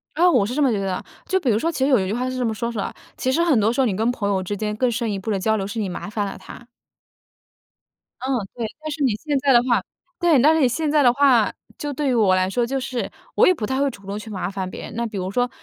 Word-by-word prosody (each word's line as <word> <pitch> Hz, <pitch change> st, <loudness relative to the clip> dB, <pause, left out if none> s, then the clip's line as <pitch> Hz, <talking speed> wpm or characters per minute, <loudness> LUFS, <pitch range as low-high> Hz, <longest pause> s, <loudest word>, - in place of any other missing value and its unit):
啊， 355 Hz, +3 st, +5 dB
我 235 Hz, -, +3 dB
是 240 Hz, -, -4 dB
这 300 Hz, -, 0 dB
么 270 Hz, -4 st, +4 dB
觉 205 Hz, -, 0 dB
得 195 Hz, -, -2 dB
的。 185 Hz, -, -3 dB, 0.2 s
就 380 Hz, 0 st, +1 dB
比 270 Hz, -, -1 dB
如 215 Hz, -1 st, +3 dB
说 330 Hz, +5 st, 0 dB
其 300 Hz, -, -6 dB
实 265 Hz, -, +3 dB
有 255 Hz, -, +5 dB
一 190 Hz, -, -1 dB
句 200 Hz, -, -2 dB
话 250 Hz, +2 st, -1 dB
是 255 Hz, -, -4 dB
这 250 Hz, -, 0 dB
么 220 Hz, -, 0 dB
说 235 Hz, +2 st, -3 dB
出 220 Hz, -, -4 dB
来， -, -, -3 dB, 0.2 s
“其 260 Hz, -, 0 dB
实 335 Hz, +5 st, +2 dB
很 295 Hz, -10 st, +3 dB
多 215 Hz, +2 st, +3 dB
时 245 Hz, -, -3 dB
候 -, -, +3 dB
你 205 Hz, -6 st, 0 dB
跟 225 Hz, +4 st, +1 dB
朋 205 Hz, -5 st, -2 dB
友 190 Hz, -2 st, +1 dB
之 205 Hz, +3 st, -3 dB
间 210 Hz, 0 st, -2 dB
更 250 Hz, +3 st, +1 dB
深 230 Hz, -1 st, -1 dB
一 200 Hz, -, -2 dB
步 195 Hz, -, -6 dB
的 195 Hz, -, 0 dB
交 220 Hz, +3 st, +1 dB
流 195 Hz, -, -2 dB
是 225 Hz, +2 st, -4 dB
你 205 Hz, -, -1 dB
麻 180 Hz, -, -6 dB
烦 210 Hz, -1 st, -2 dB
了 195 Hz, -, -6 dB
他”。 -, -, -11 dB, 1.6 s
嗯， 260 Hz, +1 st, -1 dB, 0.2 s
对， 235 Hz, -2 st, -3 dB, 0.2 s
但 310 Hz, -, -5 dB
是 290 Hz, -1 st, -2 dB
你 250 Hz, -, +3 dB
现 290 Hz, +4 st, -2 dB
在 270 Hz, -1 st, +3 dB
的 240 Hz, -, +7 dB
话 245 Hz, -2 st, +2 dB, 0.4 s
对， 340 Hz, -6 st, +4 dB
但 305 Hz, +4 st, +6 dB
是 320 Hz, -, +2 dB
你 265 Hz, -, +5 dB
现 300 Hz, +5 st, -1 dB
在 300 Hz, -1 st, +4 dB
的 245 Hz, -3 st, +5 dB
话， 255 Hz, -5 st, +4 dB, 0.2 s
就 290 Hz, -1 st, -4 dB
对 280 Hz, 0 st, -1 dB
于 -, -, +2 dB
我 210 Hz, -6 st, +4 dB
来 185 Hz, 0 st, +1 dB
说， 240 Hz, +4 st, 0 dB
就 270 Hz, +3 st, -2 dB
是 255 Hz, -2 st, -3 dB, 0.3 s
我 -, -, +5 dB
也 370 Hz, -, +6 dB
不 225 Hz, -11 st, -4 dB
太 265 Hz, +3 st, -1 dB
会 280 Hz, -, +2 dB
主 200 Hz, -6 st, -12 dB
动 200 Hz, +2 st, -4 dB
去 220 Hz, +1 st, -9 dB
麻 190 Hz, -2 st, -3 dB
烦 190 Hz, -2 st, -4 dB
别 -, -, -8 dB
人。 -, -, -8 dB
那 235 Hz, -, -1 dB
比 210 Hz, -3 st, -6 dB
如 185 Hz, +1 st, -3 dB
说 245 Hz, +3 st, +1 dB
240 Hz, 345 characters per minute, -22 LUFS, 205-270 Hz, 1.6 s, 的